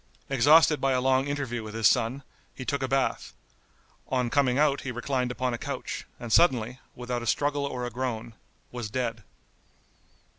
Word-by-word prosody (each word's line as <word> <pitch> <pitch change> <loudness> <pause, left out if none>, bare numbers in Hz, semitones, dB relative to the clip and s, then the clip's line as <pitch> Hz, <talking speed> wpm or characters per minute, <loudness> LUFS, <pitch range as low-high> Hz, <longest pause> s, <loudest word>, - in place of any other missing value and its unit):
Exhausted 145 +3 +5
by 135 -1 +2
a 130 - +2
long 130 +1 +2
interview 135 -5 -3
with 110 0 -8
his 115 -2 +4
son, 125 +8 +1 0.3
he 130 - -7
took 140 +1 -1
a 130 - 0
bath; 135 0 -1 0.7
on 125 -2 0
coming 135 -3 +2
out 145 -1 +3
he 130 - -4
reclined 125 +1 -1
upon 125 0 -2
a 120 - -4
couch, - - -5
and 120 -2 -4
suddenly, 125 -6 +3 0.2
without 125 0 -4
a 120 - -6
struggle 145 +3 +1
or 125 -2 -4
a 120 - -5
groan, 120 -2 -4 0.4
was 120 -3 -5
dead. 115 -1 -2
130 Hz, 175 wpm, -27 LUFS, 120-135 Hz, 0.7 s, Exhausted